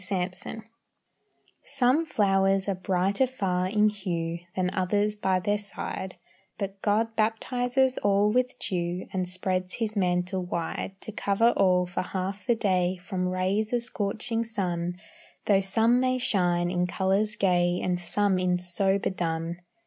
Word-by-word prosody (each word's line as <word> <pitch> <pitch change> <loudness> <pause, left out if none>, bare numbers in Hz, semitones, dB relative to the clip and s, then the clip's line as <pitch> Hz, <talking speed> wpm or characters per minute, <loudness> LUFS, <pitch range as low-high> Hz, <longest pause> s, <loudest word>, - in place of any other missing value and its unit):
THE 185 - -11 0.3
FLOWERS 220 +4 -7 1.0
Some 275 +4 +1
flowers 195 -4 +2
are 200 - +1
brighter 190 +6 +1
far 185 -7 -1
in 210 +2 +3
hue 170 -5 -3 0.2
Than 185 -1 0
others 205 +2 +1
by 190 -3 +1
their 205 +3 0
side, 195 -2 -5 0.4
But 195 -1 -5
God 220 +2 +1
baptizes 245 +4 +1
all 205 +1 +3
with 250 +2 +1
dew, 175 0 -2
And 185 -1 -1
spreads 185 0 -2
His 220 -2 -2
mantle 180 -1 0
wide 180 +2 -4
To - - -6
cover 210 +3 +2
all 180 -1 +3
for 180 0 -3
half 190 +4 -4
the 240 - +4
day, 185 -4 +1
From 185 0 -3
rays 190 +5 0
of 240 -1 +1
scorching 225 +1 -2
sun, 180 -6 -2 0.5
Though 195 -2 +4
some 225 +5 +4
may 255 0 +1
shine 175 -7 +1
in 180 0 0
colors 195 +4 +1
gay, 180 -3 +2
And 180 -1 0
some 190 +2 +1
in 180 -1 +1
sober 190 +3 +1
dun. 165 -1 -2
195 Hz, 150 wpm, -27 LUFS, 180-215 Hz, 1.0 s, the